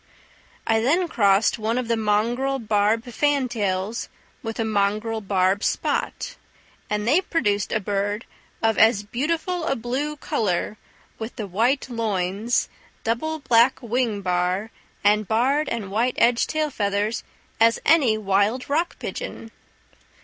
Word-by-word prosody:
I 225 0 +3
then 325 +10 +2
crossed 205 -5 +3
one 220 +2 -1
of 255 -2 -2
the 230 - +2
mongrel 230 +5 +1
barb 215 -1 +1
fantails 235 -6 -1 0.3
with 225 0 -5
a 225 - +1
mongrel 215 +2 0
barb 195 0 +1
spot, - - -1 0.5
and 210 +1 -1
they 305 +9 +4
produced 205 - 0
a 220 - +1
bird 205 +2 -2 0.4
of 225 -1 +2
as 220 -2 +5
beautiful 325 - -2
a 275 - +1
blue 265 +6 -3
colour, 210 -4 -1 0.4
with 225 +2 -6
the 220 - -4
white 230 +10 +1
loins, 215 -1 -1 0.4
double 275 +8 -1
black 245 -3 +3
wing 235 -3 0
bar, 180 +3 0 0.3
and 210 0 +3
barred 265 +7 +2
and 210 -5 -4
white 235 +4 +1
edged 235 0 +3
tail 310 -1 -1
feathers, 205 0 -1 0.4
as 230 +1 +5
any 280 -9 +4
wild 205 +4 +1
rock 330 +4 0
pigeon! 230 - -6
225 Hz, 135 wpm, -23 LUFS, 205-255 Hz, 0.5 s, as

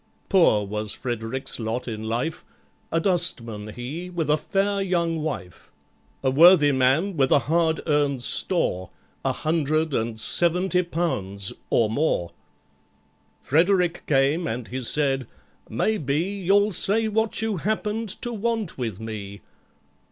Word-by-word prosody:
Poor 165 - +4
was 105 +1 -4
FREDERICK'S 120 +2 -4
lot 115 +3 -3
in 110 -2 -5
life,— 120 +8 -3 0.5
A 165 - +1
dustman 125 - +1
he 130 +11 -7
with 165 -4 -1
a - - +5
fair 200 +4 -1
young 170 -4 0
wife, 95 - -6 0.5
A 130 - +2
worthy 155 0 +6
man 135 +9 +2
with 135 -3 +2
a - - +6
hard 160 +1 +1
earned 145 -4 +1
store, 95 - +1 0.3
A - - +1
hundred 155 -1 -1
and 115 -1 -2
seventy 180 +7 +2
pounds—or 110 - -1
more. 110 - -1 1.1
FREDERICK 175 +3 +2
came, 145 +4 +2
and 115 +1 -5
he 130 +2 -4
said, 135 0 +1 0.4
"Maybe 140 - 0
You'll 200 +3 +1
say 215 +4 +3
what 220 0 -1
you 220 -3 -1
happened 215 +3 -2
to 240 - -2
want 225 - -2
with 115 -6 -4
me?" 105 -3 -7
155 Hz, 130 wpm, -24 LUFS, 120-180 Hz, 1.1 s, worthy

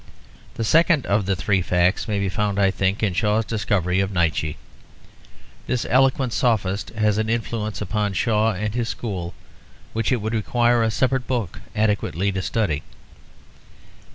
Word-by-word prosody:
The 115 - -2
second 160 - +3
of 100 -1 +1
the 100 - +2
three 95 +1 +1
facts 90 +1 +1
may 105 -2 -1
be 100 0 0
found, 100 +2 -1
I 100 -1 +4
think, 95 +2 -1
in 100 -4 +1
Shaw's 105 +3 +1
discovery 100 -5 0
of 95 0 0
Nietzsche. 85 -4 0 1.1
This 125 - -1
eloquent 130 -1 +2
sophist 100 -5 0
has 105 -1 +2
an 110 0 -1
influence 115 -2 -2
upon 105 -1 -1
Shaw 110 +2 +2
and 105 +2 -3
his 120 -1 -1
school 90 -7 -4 0.6
which 115 +3 -1
it 125 - +3
would 110 +2 -3
require 120 +2 +2
a 115 - +2
separate 130 +3 0
book 115 -9 -3
adequately 100 -3 0
to 95 -1 -2
study. 90 -8 -1
105 Hz, 155 wpm, -22 LUFS, 95-115 Hz, 1.1 s, I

